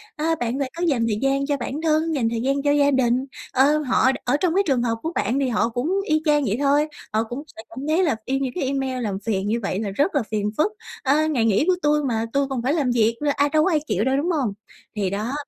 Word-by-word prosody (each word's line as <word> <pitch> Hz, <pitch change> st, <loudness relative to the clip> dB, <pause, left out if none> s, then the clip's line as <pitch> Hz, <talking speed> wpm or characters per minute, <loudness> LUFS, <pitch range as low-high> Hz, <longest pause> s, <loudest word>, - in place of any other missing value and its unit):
ơ, 325 Hz, +1 st, 0 dB
bạn 245 Hz, +3 st, -2 dB
phải 270 Hz, -2 st, -2 dB
có 345 Hz, -, -2 dB
dành 250 Hz, -7 st, +1 dB
thời 210 Hz, -2 st, 0 dB
gian 275 Hz, +1 st, +1 dB
cho 285 Hz, 0 st, 0 dB
bản 270 Hz, +4 st, -4 dB
thân, 320 Hz, 0 st, +1 dB
dành 235 Hz, -5 st, +1 dB
thời 230 Hz, 0 st, -2 dB
gian 275 Hz, +3 st, 0 dB
cho 290 Hz, -, +3 dB
gia 285 Hz, 0 st, +3 dB
đình. 255 Hz, -1 st, +2 dB, 0.3 s
Ơ, 280 Hz, +4 st, +4 dB
họ 260 Hz, -2 st, +2 dB
ở 255 Hz, +3 st, +2 dB
trong 350 Hz, 0 st, +1 dB
cái 395 Hz, -, +4 dB
trường 265 Hz, -4 st, +2 dB
hợp 230 Hz, -1 st, 0 dB
của 325 Hz, -, -2 dB
bạn 260 Hz, +4 st, 0 dB
thì 275 Hz, -, +1 dB
họ 230 Hz, 0 st, +1 dB
cũng 245 Hz, +6 st, -2 dB, 0.2 s
y 310 Hz, -3 st, +1 dB
chang 295 Hz, -1 st, +3 dB
vậy 215 Hz, 0 st, 0 dB
thôi, 290 Hz, +1 st, +3 dB, 0.3 s
họ 220 Hz, +1 st, +2 dB
cũng 240 Hz, +5 st, -6 dB
sẽ -, -, -7 dB
cảm 230 Hz, -, -9 dB
thấy 325 Hz, +4 st, +2 dB
là 300 Hz, -9 st, +2 dB
e 270 Hz, +1 st, -1 dB
những 265 Hz, -2 st, -2 dB
cái 360 Hz, -, -2 dB
email 265 Hz, -2 st, -2 dB
làm 200 Hz, -3 st, -2 dB
phiền 200 Hz, -3 st, -1 dB
như 225 Hz, +3 st, 0 dB
vậy 195 Hz, -1 st, -2 dB
là 210 Hz, -2 st, -2 dB
rất 290 Hz, -, 0 dB
là 280 Hz, -, +2 dB
phiền 210 Hz, -1 st, -1 dB
phức, 405 Hz, +8 st, +2 dB, 0.3 s
ơ, 295 Hz, +3 st, +2 dB
ngày 260 Hz, -8 st, +1 dB
nghỉ 220 Hz, +6 st, +2 dB
của 370 Hz, -, +4 dB
tui 300 Hz, -1 st, +2 dB
mà 230 Hz, -4 st, -1 dB
tui 280 Hz, 0 st, +1 dB
còn 265 Hz, -3 st, -3 dB
phải 260 Hz, +4 st, 0 dB
làm 285 Hz, -6 st, +1 dB
việc 230 Hz, -1 st, +2 dB
nữa, 290 Hz, -, +2 dB
ai 285 Hz, +1 st, +2 dB
đâu 310 Hz, +1 st, +3 dB
có 380 Hz, -, +2 dB
ai 310 Hz, -, +3 dB
chịu 200 Hz, -, 0 dB
đâu, 265 Hz, +2 st, +1 dB
đúng 325 Hz, +6 st, 0 dB
hông? 270 Hz, -, 0 dB, 0.4 s
Thì 200 Hz, -3 st, 0 dB
đó, 210 Hz, +6 st, -3 dB
270 Hz, 285 wpm, -23 LUFS, 235-295 Hz, 0.4 s, Ơ